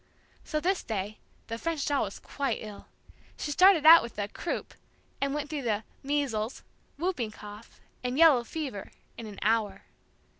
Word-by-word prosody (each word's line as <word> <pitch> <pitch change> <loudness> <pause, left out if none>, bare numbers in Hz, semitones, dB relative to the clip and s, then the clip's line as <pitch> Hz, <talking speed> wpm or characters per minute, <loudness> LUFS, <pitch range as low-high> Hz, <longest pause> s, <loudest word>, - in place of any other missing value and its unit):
So 305 - -2
this 370 +4 0
day, 210 -1 -4 0.3
the 230 0 -5
French 325 -1 -2
doll 285 -4 +1
was 200 - -7
quite 280 -1 -3
ill. 210 -2 -10 0.5
She 295 - -3
started 365 0 +6
out 330 +1 +11
with 235 - -8
the 205 -1 -2
"croup," 335 +10 -5 0.5
and 275 0 +1
went 295 +1 -2
through 300 -1 -4
the 220 -4 -1 0.2
"measles," 270 -6 -2 0.3
"whooping 310 -9 -1
cough," 210 +1 -12 0.2
and 250 +1 -2
"yellow 300 -7 +6
fever" 260 -6 -5 0.3
in 230 - -8
an 205 -2 -10
hour. 210 -3 +1
255 Hz, 160 wpm, -29 LUFS, 215-305 Hz, 0.5 s, out